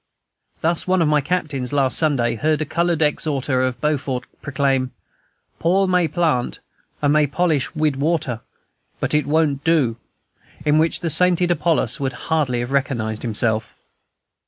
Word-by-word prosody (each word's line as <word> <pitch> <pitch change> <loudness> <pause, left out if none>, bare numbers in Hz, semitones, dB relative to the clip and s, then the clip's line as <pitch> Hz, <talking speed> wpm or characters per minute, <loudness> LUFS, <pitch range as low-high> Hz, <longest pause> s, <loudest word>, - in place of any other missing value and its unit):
Thus, 165 +2 0
one 185 0 +2
of - - +1
my 150 -1 +3
captains, 145 -6 -2
last 135 -2 +2
Sunday, 135 -7 +2
heard 150 +6 0
a 155 - -1
colored 170 +1 0
exhorter 140 -3 0
at 130 -1 -1
Beaufort 140 -4 -1 0.2
proclaim, 135 -2 0 0.7
"Paul 190 +4 +2
may 180 -2 +2
plant, 155 -6 0 0.5
and 145 0 +3
may 150 -1 +4
polish 155 0 0
wid 155 -3 0
water, 140 -5 -1 0.6
but - - -1
it 150 -2 +1
won't 145 -2 +1
do," 145 -9 +2 0.7
in 150 +1 +4
which 160 +2 +1
the 165 -3 +1
sainted 180 +1 +3
Apollos 170 -2 0
would 135 -2 -2
hardly 135 -4 -1
have 120 +2 -5
recognized 120 -6 -1
himself. 110 -1 -1
150 Hz, 150 wpm, -21 LUFS, 130-165 Hz, 0.7 s, may